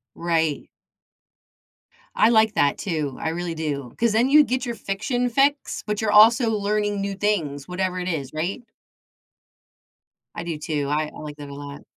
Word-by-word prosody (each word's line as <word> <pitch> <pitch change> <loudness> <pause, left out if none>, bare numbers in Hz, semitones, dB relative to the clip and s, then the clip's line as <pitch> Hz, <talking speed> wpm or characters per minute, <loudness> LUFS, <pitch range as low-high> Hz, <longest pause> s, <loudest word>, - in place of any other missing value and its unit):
Right. 165 -3 -1 1.5
I 215 - +5
like 220 -2 +4
that 145 -7 +2
too, 155 -8 -3
I - - -1
really 170 0 -3
do, 145 -6 -4
'cause 235 -1 +1
then 230 +4 +3
you 300 +2 +7
get 255 -1 -2
your 235 - -3
fiction 245 +5 -2
fix, 275 +4 +1
but 210 -1 -2
you're 220 -1 0
also 230 +3 +6
learning 205 -1 0
new 200 0 -2
things, 170 -9 -1
whatever 185 0 -2
it 180 - -3
is, 140 -6 -3
right? 170 +10 -3 1.7
I 170 - -5
do 165 -3 -4
too. 150 -2 -2
I 150 +1 0
I - - -11
like 150 -1 -8
that 145 -1 -9
a 140 - -8
lot. 145 0 -9
185 Hz, 170 wpm, -23 LUFS, 150-220 Hz, 1.7 s, you